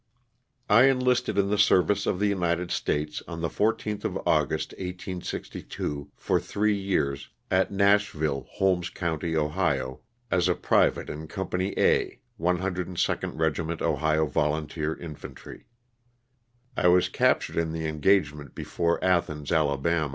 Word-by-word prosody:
T 105 - +4
ENLISTED 125 -5 +2
in 100 0 +2
the 105 - +1
service 95 +3 +3
of - - +1
the 105 - +1
United 90 -3 0
States 75 +1 -1
on 85 - -6
^ - - -6
the 80 - 0
14th 105 -1 -1
of - - -2
August, - - +1
1862, 90 -5 -5
for - - 0
three 105 0 0
years, 70 -9 -1 0.2
at 95 0 +2
Nash 100 +1 +3
ville, 75 -4 -2
Holmes 90 -2 +1
county, 80 -1 -2
Ohio, 75 -4 -1 0.3
as 90 -1 +2
a 90 - +2
private - - +2
in 80 +1 -6
Company 95 +1 -3
A, - - +2 0.2
102nd 90 +1 -1
Regiment 80 +1 -1
Ohio 80 0 +2
Volunteer 75 +1 -1
Infantry. 80 -4 -10 1.1
I - - +2
was 90 0 +5
captured - - +1
in 80 -1 0
the 80 0 -3
engagement 75 -3 +1
before 85 0 -1
Athens, 75 -5 0
Ala. 80 0 +1
85 Hz, 135 wpm, -27 LUFS, 75-95 Hz, 1.1 s, was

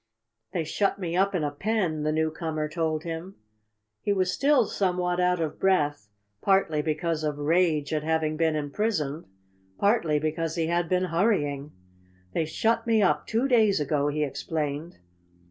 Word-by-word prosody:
"They 165 - -1
shut 195 +6 0
me 175 -3 -3
up 195 +1 +2
in 165 - 0
a 145 - -1
pen," 180 -1 -1
the 155 0 0
newcomer 155 0 -1
told 155 -1 -2
him. 170 +3 -6 0.7
He 205 - 0
was 185 -2 +1
still 275 -3 +3
somewhat 180 -3 0
out 180 0 +2
of 160 -2 -3
breath, 145 - +1 0.3
partly 190 -6 +2
because 160 +1 -1
of 150 -1 -1
rage 155 -1 +1
at 155 - 0
having 155 0 0
been 160 0 +1
imprisoned, 155 0 -2 0.5
partly 200 -8 +2
because 155 +2 -2
he 165 -2 0
had 170 0 0
been 185 0 +2
hurrying. 150 -6 0 0.6
"They 160 - 0
shut 230 +8 0
me 220 -2 +4
up - - +1
two 230 +4 +1
days 220 - +4
ago," 145 0 0
he 150 +1 0
explained. 150 +2 -3
165 Hz, 160 wpm, -26 LUFS, 150-190 Hz, 0.7 s, me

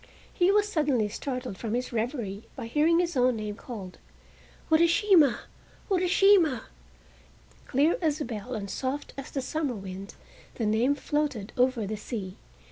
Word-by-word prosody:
He 360 +2 +3
was 415 +1 +3
suddenly 290 - +1
startled 250 -3 -5
from 225 -1 -2
his 250 0 -3
reverie 225 -4 -2
by - - -6
hearing 305 +8 +3
his 345 -2 0
own 250 -1 +3
name 215 -1 -4
called: 205 -6 -9 0.7
"Urashima, 340 - +5 0.5
Urashima!" 365 - +4 1.1
Clear 290 +5 +2
as 310 -2 +1
a 295 - -2
bell 235 +1 -5
and 205 -2 -4
soft 265 +7 -4
as 275 +1 -7
the 270 - -3
summer 290 -2 -2
wind 195 0 -8 0.4
the 230 - -2
name 230 +6 +2
floated 285 -7 -2
over 250 -3 +2
the 215 +2 -4
sea. 205 -3 -6
255 Hz, 145 wpm, -28 LUFS, 220-310 Hz, 1.1 s, Urashima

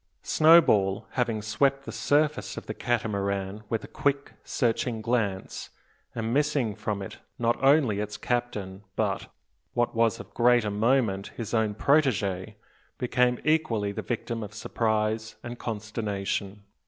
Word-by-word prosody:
Snowball, 110 - +5
having 115 -4 -1
swept 135 +5 +1
the - - -5
surface 150 +1 +1
of - - -6
the - - -4
Catamaran 100 -4 -1
with 115 -2 -1
a - - -8
quick, 140 0 -1
searching 120 -1 0
glance, 110 -4 -2 0.5
and 115 0 -2
missing 145 -6 +1
from 105 -1 -3
it - - -9 0.2
not 120 0 +2
only 135 -7 +4
its 105 0 -4
captain, 105 -6 -3
but - - -1 0.4
what 120 0 +1
was 115 -1 +2
of - - -11
greater 120 -3 +3
moment 105 -2 +1
his 115 -2 -5
own 110 -2 +1
protege, 110 -8 +1 0.4
became 125 0 +2
equally 140 -10 +1
the - - -4
victim 115 -1 -3
of 105 -1 -7
surprise 110 0 -1
and 120 0 -7
consternation. 105 -2 -3
115 Hz, 135 wpm, -27 LUFS, 105-125 Hz, 0.5 s, Snowball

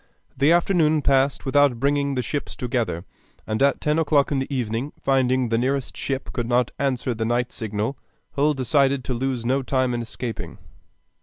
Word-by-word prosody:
The 140 +4 +3
afternoon 165 -4 +3
passed 135 0 +2
without 140 -2 +3
bringing 140 +1 +1
the 125 - -1
ships 145 +3 -4
together, 120 -8 -2 0.4
and 110 +3 -2
at 140 0 +3
ten 150 +1 +1
o'clock 145 -3 +2
in 140 - +1
the 135 - -4
evening, 125 +1 -2
finding 130 -1 +2
that 120 - -2
the - - +2
nearest 135 +1 -1
ship 135 -1 -4
could 120 -2 -2
not 120 0 +2
answer 130 -2 0
the 110 0 -3
night 120 +2 0
signal, 110 +3 -3 0.3
Hull 150 +1 +1
decided 135 +1 +2
to 130 - -3
lose 125 -1 -2
no 135 +3 +1
time 130 -1 0
in 120 - -2
escaping. 115 0 -6
130 Hz, 180 wpm, -23 LUFS, 120-140 Hz, 0.4 s, The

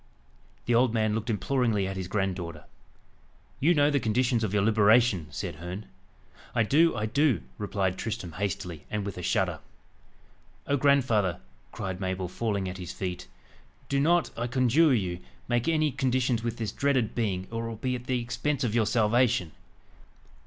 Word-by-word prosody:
The 120 - +1
old 120 0 +3
man 110 -1 +1
looked 110 +2 -3
imploringly 115 -2 +1
at 95 - -4
his 95 -1 -4
granddaughter. 90 -5 -3 1.0
"You 170 +5 +4
know 145 0 +4
the 140 - +2
conditions 120 +1 +1
of 105 - -1
your 105 -1 +2
liberation?" 110 -4 +4
said 85 0 -5
Herne. 90 +5 -6 0.7
"I 115 - +4
do 160 +8 +4
I 105 - -1
do," 130 - +2 0.2
replied 95 -3 -1
Tristram 105 -6 -4
hastily, 90 -3 -4
and 105 -2 -2
with 100 -2 -5
a - - -4
shudder. - - 0 1.1
"Oh, 140 - +1
grandfather!" 130 - +2 0.3
cried 95 -4 -5
Mabel, 95 -1 -2
falling 100 0 -2
at 90 +1 -6
his 90 - -6
feet, 90 -2 -5 0.6
"do 140 - +1
not, 170 +4 +3
I 120 +1 -2
conjure 130 +5 +3
you, 90 -8 0 0.3
make 120 +2 0
any 155 -2 +2
conditions 130 -2 0
with 115 -1 -3
this 110 -2 -3
dreaded 135 -6 +1
being, 95 -6 -1
or 115 0 -3
it - - -4
will 115 - -5
be 125 +4 -2
at 125 -1 -5
the 125 -1 0
expense 120 +4 -2
of 115 -4 0
your 115 -3 +2
salvation. 115 -5 +2
110 Hz, 170 wpm, -28 LUFS, 95-125 Hz, 1.1 s, You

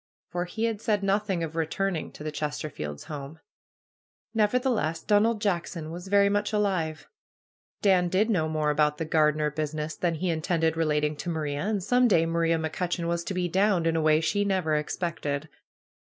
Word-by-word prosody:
For 175 0 -1
he 220 +5 -4
had 225 -2 -1
said 210 -3 0
nothing 195 -3 0
of 160 -1 -5
returning 165 +2 -1
to - - -10
the 155 - -3
Chesterfields' 145 - -4
home. 145 +1 -8 0.9
Nevertheless, 215 - +1
Donald 215 +2 +3
Jackson 170 -5 -2
was 175 +3 -7
very 200 +1 +4
much 205 +1 0
alive. 185 -7 -1 0.8
Dan 185 -3 +4
did 195 +5 +2
know 170 -8 +1
more 155 -1 +1
about 150 0 +2
the 160 - -2
gardener 150 -1 +2
business" 155 +1 -3
than 170 -2 0
he 175 +3 -1
intended 160 0 0
relating 150 -2 +1
to 175 - -4
Maria. 150 -3 -2
And 210 -3 -1
some 250 +5 +4
day 165 -7 +4
Maria 165 0 +1
McCutcheon 170 +2 -2
was 170 0 -1
to 195 - -3
be 180 -1 0
downed" 190 -1 +2
in 165 0 +2
a 160 - +2
way 155 0 +4
she 205 +5 +1
never 185 -6 0
ex 150 0 -1
pected. 155 -4 -3
165 Hz, 180 wpm, -27 LUFS, 155-195 Hz, 0.9 s, very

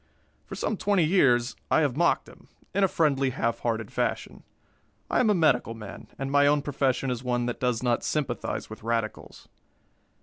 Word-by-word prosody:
For - - -7
some 220 - -2
twenty 200 -3 +2
years 130 -8 +3
I - - +4
have 140 -5 +1
mocked 170 +3 +2
him, - - -17 0.3
in 200 - +2
a - - +6
friendly, 140 -6 +1
half 115 -2 -1
hearted 110 -3 -2
fashion. - - -2 0.7
I - - +2
am 240 - +3
a 210 - +4
medical 135 -9 +2
man, 105 -2 -10
and 135 0 -4
my 145 0 +5
own 145 0 +3
profession 135 -2 0
is 125 0 -4
one 120 -1 0
that 120 - -3
does 125 -2 0
not 120 -1 +1
sympathize 140 -6 -2
with 110 - -10
radicals. 115 -1 -4
130 Hz, 180 wpm, -27 LUFS, 120-150 Hz, 0.7 s, a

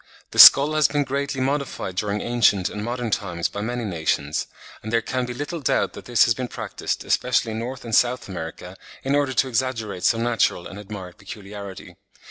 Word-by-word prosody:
The - - -4
skull 145 +3 +10
has 155 -2 +4
been 145 0 0
greatly 140 0 -3
modified 135 -8 -2
during 105 +2 -2
ancient 105 -5 +2
and 105 - -5
modern 120 0 -3
times 90 -5 -1
by 100 - -6
many 120 +2 -3
nations; 80 -5 -1 0.3
and 110 - -6
there 115 - +3
can 125 +1 -2
be 125 - -5
little 145 +5 -4
doubt 140 - 0
that - - -11
this 120 -4 +4
has 115 - +3
been 125 +2 -4
practised, - - -5
especially 125 -2 +1
in 110 +1 -4
N. 120 - -3 0.2
and 115 - -7
S. 125 +3 +2
America, 90 0 -7 0.3
in 135 - 0
order 145 -2 +1
to 135 - +2
exaggerate 115 -6 -2
some 115 0 +2
natural 115 -7 +1
and 100 - -9
admired 95 -3 -9
peculiarity. 100 -1 -9
115 Hz, 195 wpm, -23 LUFS, 100-130 Hz, 0.3 s, skull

